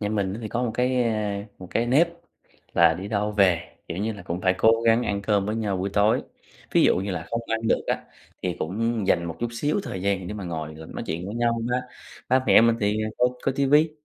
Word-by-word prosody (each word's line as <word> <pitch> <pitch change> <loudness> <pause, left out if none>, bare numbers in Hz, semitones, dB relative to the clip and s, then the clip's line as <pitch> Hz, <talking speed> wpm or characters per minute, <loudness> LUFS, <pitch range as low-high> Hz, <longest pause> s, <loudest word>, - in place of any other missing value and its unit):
Nhà 105 - -1
mình 100 -3 -1
á - - -6
thì 110 - -4
có 120 +3 -2
một 120 - 0
cái, 125 0 +2
a, 105 -3 -1
ờ, - - -8
một 90 - -9
cái 120 +1 0
nếp 150 +8 +4 0.7
là 85 -1 +5
đi 95 +4 -6
đâu 105 0 0
về, 95 -5 +4 0.3
kiểu, 85 - -4
như 110 +2 -1
là 100 -3 -10
cũng 90 0 -4
phải 95 0 +2
cố 115 +3 +4
gắng 115 +1 +5
ăn 100 -4 -2
cơm 100 -1 +1
với 110 +2 -1
nhau 105 -4 -1
buổi 95 +2 -2
tối. 105 +4 +3 0.5
Ví - - +5
dụ - - +4
như 95 +2 -2
là 90 - -4
không 115 - -1
ăn 110 0 -1
được - - +3
á, - - -1 0.4
thì 90 -2 -2
cũng 110 +4 -1
dành 85 -3 +2
một 85 - -5
chút 120 - 0
xíu 145 - 0
thời 95 - -5
gian 95 -2 0
để 105 - -5
mà 105 -2 -6
ngồi 80 -3 -5
mà 80 +1 -10
nói - - -6
chuyện 85 +3 -3
với 100 - -5
nhau 115 -1 +1
ha. 125 - +1 0.5
Ba 130 +1 +3
mẹ - - +7
mình 115 0 +4
thì, 105 +1 +1 0.2
ơ, 125 - +5 0.2
coi 135 - +1
ti 140 -1 +2
vi, 150 +3 +5
105 Hz, 265 wpm, -25 LUFS, 95-115 Hz, 0.7 s, mẹ